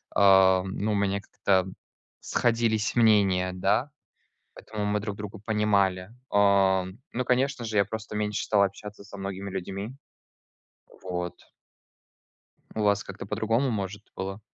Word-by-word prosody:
ам, 95 -1 +5
ну, 105 +1 0
у - - +1
меня 100 0 +1
как-то 95 -3 +1 0.5
сходились 115 -3 +1
мнения, 100 -5 +4
да, 105 +9 +1 0.6
поэтому 105 -1 -5
мы 105 0 +1
друг 105 -1 -4
друга 105 +1 -7
понимали. 100 -3 +1 0.2
Ам, 95 -2 +3 0.2
ну, 125 +1 -1
конечно 130 +1 +1
же, 110 -1 -2
я 100 - +4
просто 110 +1 -6
меньше 105 -1 -1
стал 100 -2 +3
общаться 100 +1 -5
со 100 0 -11
многими 100 0 -5
людьми. 100 +5 -5 1.1
Вот. 90 -1 -4 1.4
У 110 - -1
вас 100 -1 +2
как-то 100 0 -8
по-другому, 110 +5 0
может, 100 -1 -4
было? 95 +2 -5
100 Hz, 130 wpm, -27 LUFS, 95-110 Hz, 1.4 s, ам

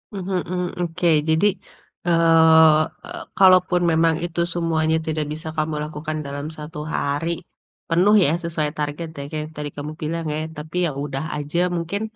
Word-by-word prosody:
Mhm 190 0 -5 0.2
mhm. 180 0 -1 0.2
Oke, 175 +1 -1 0.2
jadi, 160 +5 +3 0.6
eee 160 -2 +6 0.2
e - - -10 0.3
kalaupun 185 -1 +5
memang 165 0 +3
itu 170 0 -5
semuanya 160 -2 +1
tidak 155 -1 -1
bisa 155 +1 -7
kamu 155 0 -1
lakukan 155 +1 -5
dalam 140 +1 -5
1 150 0 -8 0.2
hari 145 +4 -1 0.6
penuh 185 +6 +4
ya, - - +3
sesuai 155 -3 -1
target 150 +3 -3
ya, - - -4
kaya 155 - -3
yang 155 - -9
tadi 150 -1 -4
kamu 150 +1 -5
bilang 165 +2 -3
ya. 150 - -2 0.2
Tapi 155 +3 -8
ya - - 0
udah 135 0 -4
aja, 150 +3 -2 0.2
mungkin, 170 +5 -3
160 Hz, 165 wpm, -22 LUFS, 150-170 Hz, 0.6 s, eee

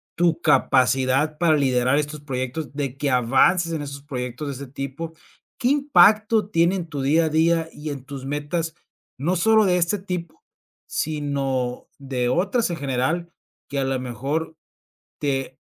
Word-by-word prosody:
tu 170 -1 +2
capacidad 135 0 +3
para 165 -1 +3
liderar 130 -1 +2
estos 150 0 -4
proyectos 135 +2 -4
de 140 -2 -3
que 140 -1 0
avances 135 +8 +3
en 160 - -2
estos 140 0 -7
proyectos 130 0 -5
de 140 - -3
este 140 +1 -8
tipo? 140 +5 -6 0.5
¿Qué 250 - +1
impacto 220 -7 +4
tiene 170 +1 +3
en 175 -3 -4
tu 145 -4 -4
día 155 +5 +3
a - - 0
día 165 +1 +2
y 150 +1 -7
en 140 -3 -6
tus 135 -1 -8
metas, 150 +4 -3 0.4
no 165 +8 0
sólo 220 +4 +4
de 180 -2 +3
este 175 +3 +1
tipo, 180 -3 -6 0.4
sino 140 -5 -2
de 130 -3 -2
otras 195 - +1
en 170 - -3
general?, 140 +5 -1 0.4
que 140 - -2
a - - +1
la 135 0 0
mejor 140 +7 -3 0.6
te 135 -2 -2
150 Hz, 160 wpm, -23 LUFS, 135-170 Hz, 0.6 s, impacto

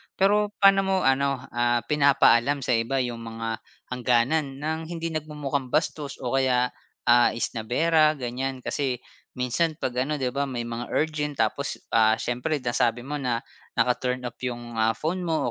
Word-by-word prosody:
Pero 205 +2 +2
paano 195 0 +7
mo 190 0 +1
ano, 135 0 +2
ah, 120 0 +1
pinapaalam 140 -2 +4
sa 130 - -1
iba 130 +4 0
'yung 120 -2 -3
mga 115 0 -5 0.3
hangganan 130 +3 +1
ng 160 +1 -1
hindi 165 0 -4
nagmumukhang 150 -3 -3
bastos 150 -2 -1
o 125 - -2
kaya, 125 -2 +2 0.3
ah, 120 0 +5
isnabera, 150 +8 +2
ganiyan? 130 0 -4
Kasi 130 -4 -2 0.3
minsan 140 +6 0
'pag 130 -5 -3
ano, 145 +4 0
'di 130 -3 -1
ba, 140 +2 -1
may 125 -3 -3
mga 120 +1 -5
urgent, 150 -1 -1
tapos, 135 +6 -2 0.2
ah, 110 -1 +5
siyempre 125 +6 -2
nasabi 120 0 +1
mo 145 +3 -4
na 125 -4 -1 0.3
naka-turn 125 +1 +1
off 120 -1 -6
'yung, 120 -2 -6
ah, 110 0 +3
phone 170 +4 -2
mo 155 -6 0
130 Hz, 160 wpm, -25 LUFS, 120-150 Hz, 0.3 s, paano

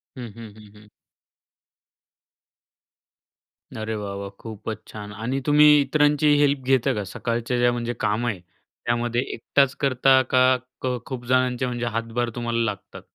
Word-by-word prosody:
हं, 125 -3 -7
हं, 115 -3 -10
हं, 105 -2 -15
हं. 105 0 -17 2.9
अरे 110 0 -4
वाह, 100 -2 -5
वाह! 100 0 -6
खूपच 110 -1 -7
छान 105 -1 -9
आणि 115 +6 -3
तुम्ही 150 0 +5 0.2
इतरांची 145 +1 +2
हेल्प 145 -1 +3
घेता 135 0 +2
का, 105 -3 -3
सकाळच्या 120 +5 -3
ज्या 120 0 +4
म्हणजे 120 0 -3
काम 110 +3 0
आहे 105 -6 -2
त्यामध्ये 120 +7 -3
एकटाच 140 +3 +1
करता 135 0 +4
का 130 0 +5 0.3
क 125 -1 -1
खूप 125 -2 -6
जणांचे 130 0 +1
म्हणजे 120 -1 -3
हातभार 115 +1 -2
तुम्हाला 120 -1 -2
लागतात? 105 -3 -6
120 Hz, 140 wpm, -23 LUFS, 110-130 Hz, 2.9 s, तुम्ही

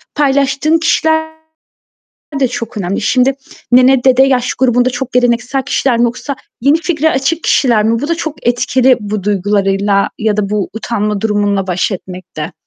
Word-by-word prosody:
paylaştığın 280 +2 +1
kişiler 315 -1 0 1.1
de 260 - +2
çok 230 0 -6
önemli. 190 0 -2
Şimdi 255 +4 +2 0.4
nene, 255 +1 +5
dede 260 0 +5
yaş 260 -2 +1
grubunda 250 0 +2
çok 245 +1 -5
geleneksel 245 +2 +1
kişiler 245 -2 0
mi 240 - +3
yoksa 250 +4 -3 0.2
yeni 285 +6 +3
fikre 320 -2 0
açık 285 +5 -1
kişiler 230 -6 +2
mi? 230 +1 +1
Bu 290 - -3
da 335 - +1
çok 315 -5 -6
etkili 250 +1 +2
bu 210 -1 -4
duygularıyla 200 0 0
ya 215 -2 0
da 205 -2 -1
bu 210 -2 -2
utanma 210 -2 -2
durumunla 205 -2 0
baş 180 +3 -1
etmekte. 180 -4 -7
245 Hz, 155 wpm, -14 LUFS, 210-270 Hz, 1.1 s, nene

